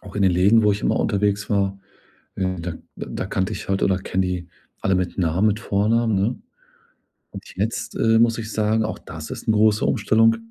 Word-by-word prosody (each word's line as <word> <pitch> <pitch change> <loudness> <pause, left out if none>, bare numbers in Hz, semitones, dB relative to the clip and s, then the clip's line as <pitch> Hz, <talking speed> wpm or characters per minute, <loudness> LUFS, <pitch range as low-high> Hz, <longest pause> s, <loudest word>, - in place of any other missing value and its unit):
auch 100 -1 -11
in 100 - +1
den 95 -2 +4
Läden, 100 +6 +4
wo 105 - +4
ich 100 - -4
immer - - +1
unterwegs 100 -1 0
war, 100 -1 0 0.6
äh, 95 -2 -2
da 85 0 -4 0.2
da - - -5
kannte 95 +3 -2
ich - - -6
halt 95 0 0
oder 95 -1 +2
kenne 95 0 -1
die 90 -1 -4 0.3
alle 95 - +1
mit 90 0 -2
Namen, 90 +4 +2
mit 105 0 -1
Vornamen, 110 +2 +1
ne, 105 +6 0 0.9
und - - -9
jetzt, - - -3
äh, 115 0 +3
muss 115 0 +3
ich 110 -1 -5
sagen, 110 +1 +1
auch 110 - -4
das 80 -1 -9
ist - - -7
‘ne 110 - +4
große 105 0 +3
Umstellung, 115 +1 +3
100 Hz, 205 wpm, -22 LUFS, 95-110 Hz, 0.9 s, den